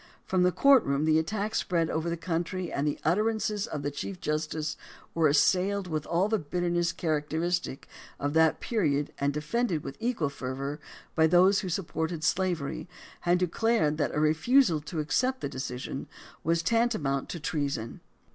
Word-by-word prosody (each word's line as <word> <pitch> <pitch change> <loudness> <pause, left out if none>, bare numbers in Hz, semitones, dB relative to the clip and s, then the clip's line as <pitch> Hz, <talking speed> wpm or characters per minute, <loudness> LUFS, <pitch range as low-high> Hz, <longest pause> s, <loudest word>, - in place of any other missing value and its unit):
From 185 -1 +1
the 180 0 +4
courtroom 175 - +4
the 155 0 +4
attack 210 +6 -2
spread 170 -6 +1
over 160 +2 -1
the 170 - -2
country 170 +1 -3
and 140 +2 0
the 145 - -1
utterances 210 +3 +1
of 145 -2 -5
the 145 - -1
chief 180 +6 -6
justice 155 -1 -2 0.4
were 165 -2 +3
assailed 190 +7 +3
with 155 -4 -3
all 175 +4 +2
the 220 0 +1
bitterness 175 +2 0
characteristic 160 0 -2 0.3
of 145 +1 -1
that 160 0 +4
period 150 -11 0
and 140 0 +1
de 150 +1 -3
fended 180 -1 -1
with 140 - -7
equal 225 - 0
fervor 140 +2 -5 0.3
by 160 -1 +4
those 185 +4 +5
who 190 - -4
supported 165 -2 -2
slavery 160 -2 -1 0.4
and 175 +1 +4
who 180 - +3
declared 180 -5 +1
that - - 0
a - - +1
refusal 160 - +3
to 155 +2 -5
accept 255 - 0
the - - -3
decision 130 -1 -5 0.4
was 165 +1 +1
tantamount 185 - +1
to 170 - -5
treason. 140 -7 -3
165 Hz, 165 wpm, -28 LUFS, 150-185 Hz, 0.4 s, those